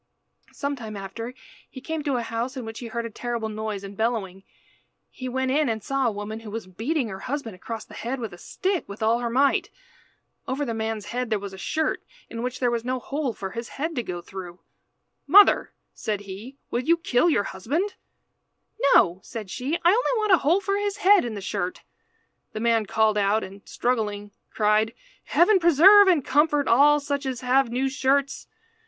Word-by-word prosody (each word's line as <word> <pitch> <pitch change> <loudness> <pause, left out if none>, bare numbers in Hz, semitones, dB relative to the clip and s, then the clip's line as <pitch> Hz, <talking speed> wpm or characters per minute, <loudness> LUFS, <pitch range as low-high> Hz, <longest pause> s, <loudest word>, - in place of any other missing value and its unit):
Some 280 0 -3
time 220 -5 -7
after 225 +6 -7 0.3
he - - -9
came 320 +3 -4
to 280 -3 +1
a 240 - -1
house 230 +4 -3
in 250 - -5
which 225 0 -7
he 240 - -6
heard 235 +1 -4
a - - -4
terrible 235 -1 -3
noise 215 -2 -4
and 200 0 -8
bellowing. 210 -4 -2 0.7
He 255 0 -6
went 260 +1 -1
in 295 -1 +2
and 220 -2 -3
saw 275 0 0
a - - +1
woman 210 +1 -6
who 225 -1 -10
was 225 0 -5
beating 230 - -2
her 190 -1 -7
husband 255 -2 -4
across 225 +4 -7
the - - -15
head 250 +3 -4
with 225 -6 -5
a - - -10
stick 375 - -2
with 200 +2 -6
all 225 +2 +3
her 240 -1 -2
might. 270 +4 +2 0.8
Over 280 +3 -1
the 235 - -3
man's 220 -1 -3
head 250 0 -2
there 215 - +1
was 200 -1 -7
a - - -9
shirt 315 +9 -1 0.3
in 230 - -5
which 250 +1 -3
there 245 -2 +2
was 235 -1 -1
no 255 +1 -1
hole 275 +2 -3
for 195 -3 -6
his 230 +3 -6
head 320 +4 -3
to 250 - -1
go 180 -6 -5
through. 180 -1 -9 0.7
"Mother," 400 +7 +6 0.2
said 210 -3 -3
he, 205 +7 -9
"will 240 - 0
you 335 +6 +3
kill 330 -1 +2
your 205 -10 +2
husband?" 285 - -2 1.0
"No," 175 +2 +4
said 215 -4 -8
she, 265 +5 -2
"I - - +8
only 485 +3 +2
want 425 -2 +1
a 370 - +8
hole 340 +8 +2
for 395 0 0
his 410 -1 -2
head 410 0 +5
in 235 -3 -4
the 200 - -6
shirt." 190 -2 -3 0.7
The 215 - -4
man 225 -2 +2
called 215 0 +2
out 205 +2 +2
and, 195 +1 -10
struggling, 210 -4 -1 0.2
cried 215 +2 +1 0.3
"Heaven 375 +3 +4
preserve 360 +5 +7
and 335 -8 +3
comfort 295 0 +2
all 290 +5 +5
such 285 -1 -3
as 255 -3 -3
have 255 0 +3
new 255 +3 0
shirts! 275 +1 0
240 Hz, 205 wpm, -25 LUFS, 215-285 Hz, 1.0 s, I